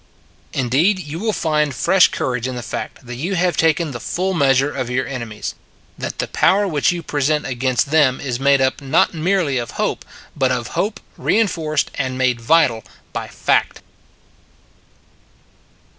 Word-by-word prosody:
Indeed, 140 - +2
you 160 -2 -6
will 220 +2 0
find 150 -7 0
fresh 190 +8 +5
courage 125 -1 -2
in 130 - -4
the 120 - -5
fact 110 +3 -6
that 120 0 -7
you 175 +9 -2
have 180 0 +1
taken 160 -1 +2
the 120 - -6
full 185 +9 -2
meas 135 -6 +3
ure 140 +2 0
of 130 -3 -3
your 130 +1 0
enemies 115 -6 -5 0.4
that - - -5
the - - -2
power 200 +2 +3
which 150 -4 +2
you 175 -1 -4
present 150 0 0
against 130 +1 0
them 145 -5 +4
is 125 -3 -3
made 140 0 +4
up 130 +2 +1
not 135 -1 +2
merely 165 -5 +1
of 120 - -6
hope, - - -1 0.3
but 130 -3 +1
of 125 -1 -2
hope 210 +2 -2 0.2
rein 225 +1 +2
forced 155 -5 -1
and 130 -1 -3
made 125 -2 +1
vital 120 -4 +3 0.3
by - - -4
fact. - - 0
140 Hz, 170 wpm, -19 LUFS, 130-165 Hz, 0.4 s, fresh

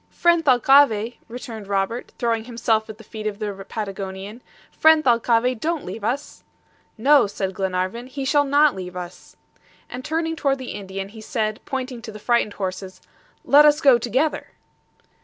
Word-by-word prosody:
"Friend 340 -1 +2
Thalcave," 250 -4 +4
returned 230 -3 -8
Robert, 200 +4 -2
throwing 230 -2 -1
himself 230 -2 0
at 215 - -8
the 225 - -13
feet 215 0 -6
of 205 -1 -4
the 200 -2 -5
Patagonian, 195 +1 -6 0.3
"friend 315 -1 +4
Thalcave, 240 -1 +2
don't 330 +2 -2
leave 200 +4 -7
us!" 255 +7 -3 0.5
"No," 280 +2 +5
said 195 -1 -4
Glenarvan, 190 +5 -2
"he 270 +1 -5
shall 290 +1 +3
not 285 +1 +4
leave 180 -1 -7
us." 180 0 -9 0.6
And 250 +1 -6
turning 325 +2 -2
toward 275 -3 0
the 260 -2 -7
Indian, 195 -1 -6
he 220 +1 -12
said, 215 -1 -2
pointing 255 -2 -4
to 220 -1 -8
the 215 - -9
frightened 235 -1 +1
horses, 185 -1 -5 0.5
"Let 290 +1 +7
us 300 0 +5
go 270 -6 +5
together." 260 +7 -1
230 Hz, 160 wpm, -22 LUFS, 205-270 Hz, 0.6 s, Let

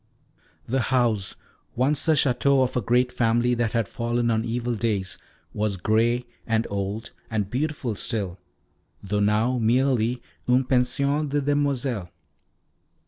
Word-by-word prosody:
The 130 +3 0
house, 120 -6 +1 0.4
once 135 +5 +1
the 160 - +5
Château 135 -1 +3
of 130 - -2
a 125 - +1
great 125 +4 +2
family 120 0 +2
that 120 -2 0
had 115 -4 +1
fallen 120 0 -1
on 110 0 +1
evil 120 +1 -2
days, 105 -4 -2 0.3
was 105 -2 -1
grey 115 +5 +1 0.2
and 115 0 +1
old, 100 +3 -3 0.2
and 105 -3 -2
beautiful 140 -3 -2
still, 100 -4 -2 0.6
though 100 +1 -1
now 110 +5 +2
merely 120 0 +2 0.3
une 125 +2 +4
pension 140 +4 +1
de 145 +1 +1
demoiselles. 140 -7 0
120 Hz, 135 wpm, -25 LUFS, 110-130 Hz, 0.6 s, the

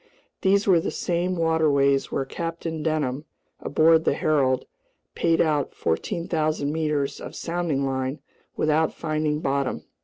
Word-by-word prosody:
These 200 +1 +3
were 185 -4 +5
the - - -2
same 180 +1 -1
waterways 150 -4 +2
where 135 - -1
Captain 165 +1 -4
Denham, 150 -3 -1 0.3
aboard 160 +2 +4
the - - +2
Herald, 135 -4 +1 0.5
payed 165 -1 +1
out 150 -4 +1
14,000 155 - -1
meters 150 -3 -1
of - - -8
sounding 165 -5 -1
line 130 +1 -2 0.4
without 155 +1 +1
finding 155 -1 -1
bottom. 140 -2 -1
155 Hz, 125 wpm, -24 LUFS, 140-165 Hz, 0.5 s, were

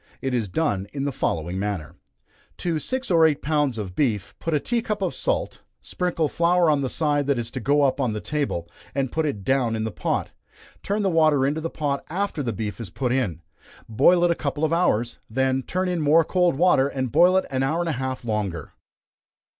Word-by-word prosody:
It 135 -1 -2
is 115 -5 -1
done 100 - -1
in 140 0 -2
the 140 - 0
following 85 - -2
manner; 95 -7 -3 0.6
to 165 -3 -1
six 260 +5 -3
or 165 -2 +5
eight 155 -3 +3
pounds 145 -5 +1
of 100 -4 -5
beef, 105 -6 -1
put 165 -2 -1
a - - +3
tea 235 - -1
cup 215 -2 -3
of 180 - -1
salt, - - -2 0.2
sprinkle 175 -4 -1
flour 170 +1 +3
on 145 -2 +1
the 130 - -1
side 145 -2 0
that 140 -2 +2
is 120 0 -4
to 130 - -4
go 145 +5 +2
up 140 0 +1
on 125 -4 0
the 105 - -3
table, 140 - -2 0.3
and 135 -2 -1
put 160 -1 0
it 105 -9 -4
down 125 -1 +1
in 110 - -2
the 110 - -2
pot, - - -2 0.5
turn 205 +1 -1
the 195 - +2
water 155 -4 +4
into 150 +3 -1
the 165 - -3
pot 145 -3 -2
after 185 -2 -2
the 120 -4 -1
beef 105 +2 -4
is 110 - -6
put 125 +8 -2
in, 105 - -1 0.4
boil 160 +10 +4
it 175 - +4
a - - +1
couple 145 0 -3
of 160 - 0
hours, 120 -9 +1
then 130 +2 +1
turn 185 +7 -2
in 175 -2 -1
more 155 +3 +5
cold 180 -1 +2
water, 150 -4 +4
and 130 -3 -3
boil 175 +4 +5
it 190 - +1
an 130 -1 0
hour 145 +5 0
and 175 -1 -1
a 135 -5 -2
half 130 -2 -4
longer. 100 -8 -3
140 Hz, 225 wpm, -24 LUFS, 120-165 Hz, 0.6 s, or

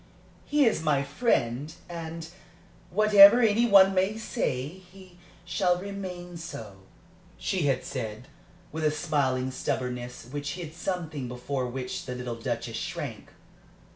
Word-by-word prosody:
"He 290 -1 +3
is 220 -8 +2
my 150 -3 +2
friend, 140 - 0 0.2
and 165 -1 -6 0.6
whatever 210 +2 +8
any 230 0 +4
one 195 -2 +7
may 190 +3 +1
say, 140 - -2
he 185 +1 -15 0.3
shall 175 0 +1
remain 180 -3 -6
so," 115 - -8 0.6
she 180 -7 -1
had 130 -2 +1
said, 110 +2 -5 0.4
with 160 +1 -4
a 155 - +4
smiling 145 -5 0
stubbornness 125 -1 -3
which 145 0 -3
hid 170 -4 -7
something 165 -6 -4
before 125 +1 -3
which 125 +1 -5
the 125 - -4
little 125 -1 -4
Duchess 115 0 -4
shrank. - - -5
160 Hz, 130 wpm, -28 LUFS, 130-190 Hz, 0.6 s, whatever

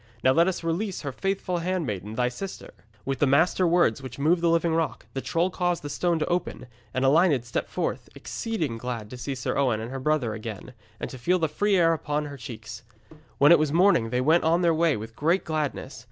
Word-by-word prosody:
Now 130 - +5
let 165 +5 +4
us 185 -2 -2
release 180 +4 -2
her 140 - -4
faithful 190 +3 -2
handmaiden, 130 - -3
thy 125 +1 +1
sister.' 185 +11 -7 0.3
With 135 0 -2
the 145 - +3
master 165 +6 +3
words 170 -8 +3
which 130 -2 -8
move 160 +5 +2
the 170 - +3
living 165 0 +2
rock, 165 -1 -1
the 135 - -3
troll 170 +6 0
caused 175 -3 -1
the 145 - -5
stone 175 +1 0
to 155 - 0
open, 175 -6 -2 0.3
and 130 +3 0
Elined 145 -3 +4
stepped 120 - -3
forth, - - -3
exceeding 160 - -3
glad 115 -3 -5
to 125 - -7
see 135 +2 -4
Sir 125 - -3
Owen 125 -6 +1
and 115 +3 -6
her 135 - -4
brother 130 -5 0
again, 110 +2 -7 0.3
and - - -3
to 130 - -9
feel 180 +10 +2
the 165 -2 +1
free 200 +7 +1
air 165 -2 +4
upon 150 -1 -2
her 145 -1 -8
cheeks. 110 -4 -8 0.6
When 145 +3 +6
it 170 - +8
was 155 -2 +1
morning 170 - +4
they 125 +2 0
went 160 +6 +3
on 170 +3 +2
their 170 -1 +4
way 160 -3 +2
with 110 +2 -8
great 165 +8 +1
gladness. 150 -6 -3
150 Hz, 225 wpm, -26 LUFS, 125-170 Hz, 0.6 s, it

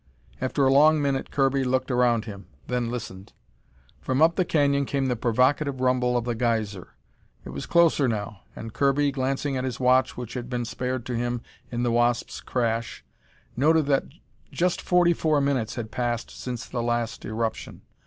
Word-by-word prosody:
After 130 +2 +1
a 135 - +4
long 155 +2 +6
minute 140 -2 -1
Kirby 135 -1 +1
looked 130 +1 0
around 120 -2 +2
him, 100 -3 -9 0.2
then 125 -2 -1
listened. 115 -5 -7 0.7
From 130 0 -1
up 165 +2 +5
the 185 - +2
canyon 140 -4 +1
came 140 -1 -1
the 125 -2 0
provocative 130 +4 +1
rumble 125 -1 +2
of 120 - -2
the 120 - -1
geyser. 110 -5 -2 0.5
It - - -7
was 70 +2 -6
closer 170 -5 +4
now, 105 -2 -3 0.2
and 115 -1 -8
Kirby, 140 +3 +2
glancing 135 +1 -1
at 130 - -2
his 130 -2 -4
watch 130 0 +3
which 120 -2 -6
had 125 -1 -5
been 120 -1 -2
spared 125 +1 -3
to 125 - -3
him 120 0 -2 0.3
in 120 0 -2
the 120 - +1
Wasp's 120 0 0
crash, 115 -2 -2 0.5
noted 155 +4 +3
that 140 -1 +1 0.5
just 180 0 0
forty 175 -1 +3
four 155 -2 +1
minutes 135 -5 0
had 115 -3 -5
passed 120 -2 -2
since 125 -2 -6
the 120 - -4
last 120 -1 -2
eruption. 110 +1 -4
125 Hz, 175 wpm, -25 LUFS, 120-140 Hz, 0.7 s, long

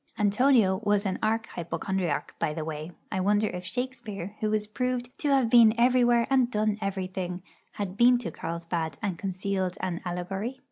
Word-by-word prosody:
Antonio 210 -2 +3
was 205 0 +2
an 190 - -1
arch 225 +1 +1
hypochondriac, 175 0 -2
by 150 - -1
the 160 -2 -3
way; 155 +1 -5 0.2
I 190 - -1
wonder 205 +3 +2
if 180 0 -6
Shakespeare, 220 -3 -5
who 215 -1 0
is 215 -1 +1
proved 250 +3 -3
to 295 - 0
have 270 -4 +4
been 230 -2 +7
everywhere 240 -1 +4
and 260 -3 +4
done 215 -2 0
everything, 185 -2 -3 0.3
had 200 -1 -4
been 245 +1 +6
to 240 - -5
Carlsbad 165 0 -4
and 190 -5 -2
concealed 190 -1 -2
an 175 -2 -3
allegory? 190 +7 -4
200 Hz, 170 wpm, -27 LUFS, 180-235 Hz, 0.3 s, been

